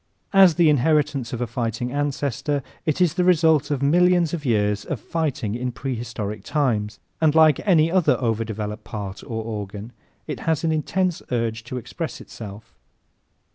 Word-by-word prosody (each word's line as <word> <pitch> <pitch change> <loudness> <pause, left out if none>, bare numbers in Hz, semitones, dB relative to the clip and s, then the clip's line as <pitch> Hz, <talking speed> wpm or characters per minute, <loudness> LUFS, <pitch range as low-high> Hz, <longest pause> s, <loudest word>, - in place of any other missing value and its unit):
As 190 -4 +7
the 170 -2 +4
inheritance 150 -3 +2
of 120 - -4
a - - +1
fighting 115 +1 -3
ancestor 145 0 -1 0.2
it 155 - +1
is 175 -4 +4
the 180 0 +1
result 160 -5 +4
of 140 -2 -1
millions 175 +2 +3
of 155 -4 -4
years 105 -4 +1
of - - -4
fighting 145 -10 -2
in 125 +2 -2
prehistoric 120 -5 -5
times, 115 -8 0 0.2
and, 155 -1 +3
like 155 -3 +6
any 165 -4 +4
other 185 -2 +3
over 115 -3 0
developed 105 -1 -5
part 100 -2 -6
or 110 -1 -4
organ, 105 0 -6 0.3
it - - -5
has 160 -1 +1
an 165 - +1
intense 175 +3 0
urge 115 -2 -1
to 125 +2 -5
express 120 - -5
itself. 110 0 -10
130 Hz, 165 wpm, -23 LUFS, 110-160 Hz, 0.3 s, As